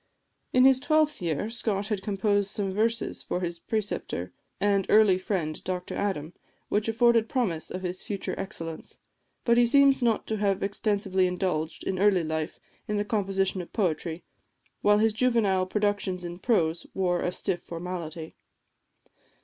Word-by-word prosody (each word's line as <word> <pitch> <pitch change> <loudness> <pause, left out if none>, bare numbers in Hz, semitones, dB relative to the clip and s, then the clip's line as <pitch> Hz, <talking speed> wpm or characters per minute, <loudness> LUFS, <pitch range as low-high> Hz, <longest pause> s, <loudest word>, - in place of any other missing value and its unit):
In 255 0 +5
his 265 -1 +6
twelfth 305 - +2
year, 170 +3 -1
Scott 215 -3 -2
had 210 -3 -1
composed 205 0 +1
some 195 -1 -2
verses 225 +3 -1
for 180 - -3
his 170 -1 -3
preceptor 195 - -3 0.3
and 200 -2 +2
early 210 -4 +5
friend 175 -5 -3
Dr 180 -1 -4
Adam, 180 -5 -2 0.4
which 210 +1 0
afforded 230 0 +3
promise 195 -12 -1
of 185 +1 -5
his 180 0 -3
future 200 -2 -4
excellence. 165 -5 -6 0.5
But 235 -1 +4
he 240 - +6
seems 275 +1 +5
not 230 -3 +1
to 220 - -2
have 200 -2 0
extensively 200 -2 +1
indulged, 175 -3 -2
in 185 - -2
early 195 -3 +4
life, 160 0 -3 0.3
in 210 - -1
the 205 - 0
composition 195 -3 0
of 175 - -12
poetry, 170 -4 -1 0.6
while 205 0 +5
his 220 0 +3
juvenile 215 -6 +2
productions 200 -2 0
in 175 +1 -6
prose 170 -8 +1
wore 180 -2 +1
a 180 - 0
stiff 180 0 -2
formality. 170 -2 -6
195 Hz, 155 wpm, -27 LUFS, 180-215 Hz, 0.6 s, his